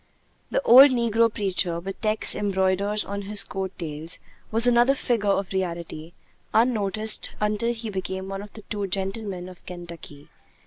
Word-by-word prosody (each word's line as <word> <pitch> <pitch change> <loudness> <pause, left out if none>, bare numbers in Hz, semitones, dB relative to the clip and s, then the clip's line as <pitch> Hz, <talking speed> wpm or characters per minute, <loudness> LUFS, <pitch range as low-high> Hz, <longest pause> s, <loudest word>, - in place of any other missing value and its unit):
The - - -1
old 270 - +9
negro 230 -2 +2
preacher, 185 -4 0
with 190 +2 -8
texts 215 -1 +3
embroidered 200 +1 +1
on 200 0 -5
his 200 0 +1
coat 190 -1 -5
tails, 160 -1 -5 0.3
was 225 +2 +3
another 245 +2 +4
figure 230 -6 -1
of 195 -1 0
reality, 170 -3 -4 0.4
unnoticed 220 -2 +2
until 210 +2 0
he 225 -2 -6
became 190 0 -4
one 195 0 -5
of 205 0 -11
the 215 - -12
'Two 205 -1 -4
Gentlemen 195 -1 -3
of 185 -1 -13
Kentucky.' 170 -5 -10
200 Hz, 150 wpm, -24 LUFS, 185-220 Hz, 0.4 s, old